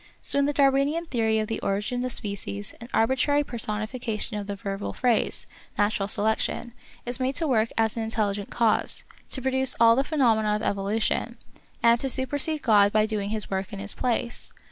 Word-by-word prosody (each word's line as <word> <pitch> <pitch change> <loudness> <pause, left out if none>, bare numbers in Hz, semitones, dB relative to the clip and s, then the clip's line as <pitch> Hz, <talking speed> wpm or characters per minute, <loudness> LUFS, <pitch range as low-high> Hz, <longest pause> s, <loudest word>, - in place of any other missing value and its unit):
So 280 - +4
in 280 - +3
the 290 - +1
Darwinian 280 +4 +2
theory 225 -7 0
of 215 0 -1
the 225 - -3
Origin 210 +6 -2
of 255 - -2
Species 195 - -4
an 235 - -9
arbitrary 265 +5 +2
personification 220 -1 -3
of 205 -1 -4
the 200 - -3
verbal 195 0 -5
phrase, 245 -3 +1 0.3
Natural 205 -1 +1
Selection, 220 +3 0 0.3
is 245 +1 -3
made 260 +1 -1
to 330 - +1
work 225 -4 +2
as 225 -1 +2
an 230 - -2
intelligent 210 -2 -1
cause, 230 -2 +1 0.3
to 260 - -4
produce 265 -1 +2
all 230 0 +7
the 270 - +2
phenomena 225 -8 +2
of 210 - -3
evolution, 215 +4 -1 0.5
and 235 0 +5
to 270 - -2
supersede 285 +4 0
God 205 -3 +5
by 215 0 +3
doing 210 -2 -3
his 215 -2 0
work 190 +2 -2
in 200 - -6
his 200 +1 -2
place 235 -1 -2
225 Hz, 185 wpm, -26 LUFS, 210-255 Hz, 0.5 s, all